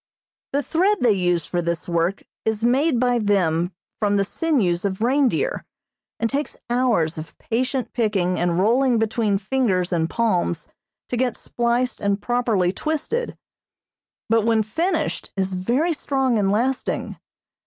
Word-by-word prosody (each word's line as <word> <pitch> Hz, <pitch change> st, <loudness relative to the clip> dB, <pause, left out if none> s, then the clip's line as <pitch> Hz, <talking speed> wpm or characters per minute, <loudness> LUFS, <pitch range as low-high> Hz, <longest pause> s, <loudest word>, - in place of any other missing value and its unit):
The 285 Hz, +1 st, +1 dB
thread 370 Hz, -, +2 dB
they 240 Hz, -, +5 dB
use 175 Hz, -4 st, +1 dB
for 175 Hz, -, -1 dB
this 170 Hz, 0 st, -2 dB
work 170 Hz, +3 st, 0 dB, 0.2 s
is 220 Hz, 0 st, -1 dB
made 260 Hz, +3 st, +3 dB
by 245 Hz, -1 st, +2 dB
them 180 Hz, -5 st, +1 dB, 0.3 s
from 205 Hz, -2 st, +1 dB
the 200 Hz, -, +2 dB
sinews 205 Hz, -, 0 dB
of 200 Hz, +1 st, -2 dB
reindeer, 280 Hz, -, +1 dB, 0.6 s
and 230 Hz, -, +1 dB
takes 285 Hz, +5 st, -3 dB
hours 225 Hz, -11 st, +1 dB
of 155 Hz, -, -10 dB
patient 255 Hz, +2 st, -2 dB
picking 200 Hz, -6 st, 0 dB
and 175 Hz, 0 st, +1 dB
rolling 240 Hz, +5 st, +3 dB
between 220 Hz, -2 st, +1 dB
fingers 195 Hz, -4 st, 0 dB
and 165 Hz, -1 st, +1 dB
palms 180 Hz, -7 st, 0 dB, 0.4 s
to 245 Hz, -, -1 dB
get 250 Hz, -1 st, 0 dB
spliced 240 Hz, +1 st, -1 dB
and 200 Hz, 0 st, +1 dB
properly 220 Hz, -6 st, +1 dB
twisted, 315 Hz, -, -2 dB, 0.9 s
but 225 Hz, 0 st, +3 dB
when 225 Hz, -1 st, +3 dB
finished 330 Hz, -, -1 dB
is 190 Hz, 0 st, 0 dB
very 245 Hz, -, +1 dB
strong 265 Hz, -6 st, 0 dB
and 195 Hz, -1 st, +2 dB
lasting. 250 Hz, +5 st, -1 dB
225 Hz, 145 wpm, -22 LUFS, 185-255 Hz, 0.9 s, they